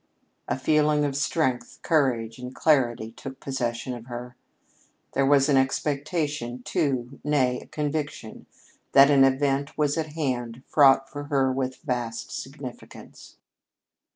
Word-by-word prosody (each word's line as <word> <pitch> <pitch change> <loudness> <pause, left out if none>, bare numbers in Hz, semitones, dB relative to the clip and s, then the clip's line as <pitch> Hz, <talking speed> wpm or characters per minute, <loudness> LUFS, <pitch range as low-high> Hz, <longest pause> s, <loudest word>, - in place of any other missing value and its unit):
A - - -1
feeling 150 +1 +2
of 140 -2 -2
strength, 135 -2 -1
courage, 125 -7 +1
and 125 +1 -8
clarity 120 -7 +2
took 130 +3 -9
possession 125 -2 -3
of 120 0 -9
her. 125 0 -7 0.8
There 135 - +2
was 140 -1 +5
an 140 -2 +4
expectation, 140 -2 -1
too, 130 -2 -1
nay, 130 -4 +1
the - - -14
conviction, 150 -6 -4 0.5
that 140 +1 +8
an 135 -2 +6
event 135 +2 +1
was 150 +1 +1
at 155 -2 -4
hand 125 -5 -3
fraught 135 -2 +5
for 145 +1 -7
her 135 -3 +1
with 130 -1 -3
vast 120 -5 -3
significance. 135 -2 -9
135 Hz, 130 wpm, -25 LUFS, 125-145 Hz, 0.8 s, that